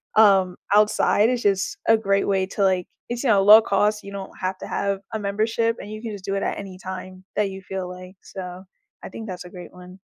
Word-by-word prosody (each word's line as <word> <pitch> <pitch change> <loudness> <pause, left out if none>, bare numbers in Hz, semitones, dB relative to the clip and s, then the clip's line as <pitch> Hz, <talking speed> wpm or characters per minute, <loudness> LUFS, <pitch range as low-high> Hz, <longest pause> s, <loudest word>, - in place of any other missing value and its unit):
um, 195 -4 +5 0.2
outside 210 +1 +4
is 250 -1 -1
just 195 -2 +1
a 225 - +6
great 200 -2 +1
way 190 -1 +1
to, 200 +1 -2
like 185 -2 +2 0.2
it's, 240 +1 -3
you 265 - +1
know, 200 -3 +5
low-cost, 210 0 +5
you 200 - -9
don't 195 -1 -7
have 185 0 -2
to - - -8
have 200 -1 -1
a 220 - -2
membership, 225 +3 0
and 205 - -8
you 215 0 -7
can 225 -1 -5
just 200 -2 -8
do 195 - -2
it 195 - -1
at - - -2
any 195 -2 -8
time 185 0 -7
that 205 -2 +2
you 190 0 -8
feel 190 -1 -5
like, 180 +1 -10
so, 180 -1 -8 0.4
I - - -7
think 225 -1 -8
that's 180 -1 -7
a 180 - -10
great 180 -2 -10
one. 180 +1 -13
195 Hz, 235 wpm, -23 LUFS, 185-210 Hz, 0.4 s, a